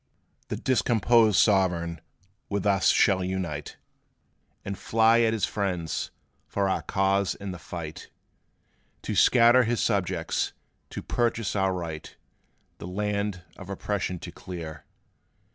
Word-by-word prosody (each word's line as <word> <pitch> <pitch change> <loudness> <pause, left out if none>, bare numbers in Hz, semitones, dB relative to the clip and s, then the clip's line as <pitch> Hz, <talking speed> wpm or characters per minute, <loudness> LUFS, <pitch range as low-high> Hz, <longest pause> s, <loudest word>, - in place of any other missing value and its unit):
"The - - -3
discomposed 115 -3 +3
Sovereign 90 -5 +2 0.5
with 100 -1 -2
us 100 -2 +3
shall 95 -3 +4
unite, 90 -6 -4 0.9
And 100 - -3
fly 115 +3 +3
at 115 -1 +3
his 110 -2 +1
friends 90 -6 -2 0.4
for 100 -1 0
our 95 - 0
cause 95 0 +1
in 100 -1 -6
the 90 - -8
fight, 80 -2 -7 0.9
To - - -3
scatter 120 +1 +6
his 120 0 0
subjects 90 -6 0 0.4
to - - -6
purchase 115 -3 -1
our 95 -1 +2
right 85 -4 -6 0.6
The - - -7
land 100 -1 -2
of 95 - -10
oppression 95 -2 -2
to - - -7
clear. 80 -4 -8
95 Hz, 125 wpm, -27 LUFS, 90-105 Hz, 0.9 s, scatter